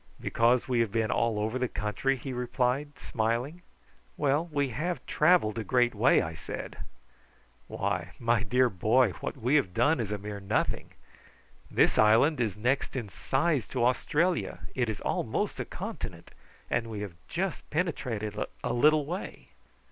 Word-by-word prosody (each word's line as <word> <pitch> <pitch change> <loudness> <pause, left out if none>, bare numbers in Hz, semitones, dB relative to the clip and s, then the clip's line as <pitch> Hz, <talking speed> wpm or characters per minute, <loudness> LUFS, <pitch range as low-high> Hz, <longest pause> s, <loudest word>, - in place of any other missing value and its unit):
"Because 120 +2 +2
we 125 -2 +1
have 115 -3 +1
been 110 0 0
all 115 -2 +1
over 110 +4 -1
the 125 - +1
country?" 105 +6 -1
he 130 +1 -6
replied, 125 +3 -1
smiling. 120 +9 -2 0.6
"Well, 145 +5 +1
we 140 -2 0
have 155 +5 -3
travelled 155 - +3
a - - -2
great 120 +1 +2
way," - - +4
I 80 - -4
said. - - -7 0.9
"Why, - - -2
my 115 -1 +2
dear 125 +2 +3
boy, 110 +3 +3
what - - -5
we 125 +2 0
have 95 -11 -1
done 145 -1 +3
is 110 -3 -2
a 105 - -1
mere 100 0 -6
nothing. 100 - -1 0.8
This - - +3
island 115 +7 +5
is 105 -5 -1
next 125 +7 0
in 120 -6 -3
size 140 - 0
to 120 -3 0
Australia. 160 +7 +1
It 125 -3 0
is 110 - -4
almost - - -1
a - - -2
continent, - - -7 0.4
and 115 0 -1
we 110 -2 -5
have 100 -4 -5
just 185 0 -3
penetrated 125 - -2 0.3
a - - -1
little 150 +4 +4
way." 175 +6 -6
125 Hz, 160 wpm, -29 LUFS, 110-145 Hz, 0.9 s, island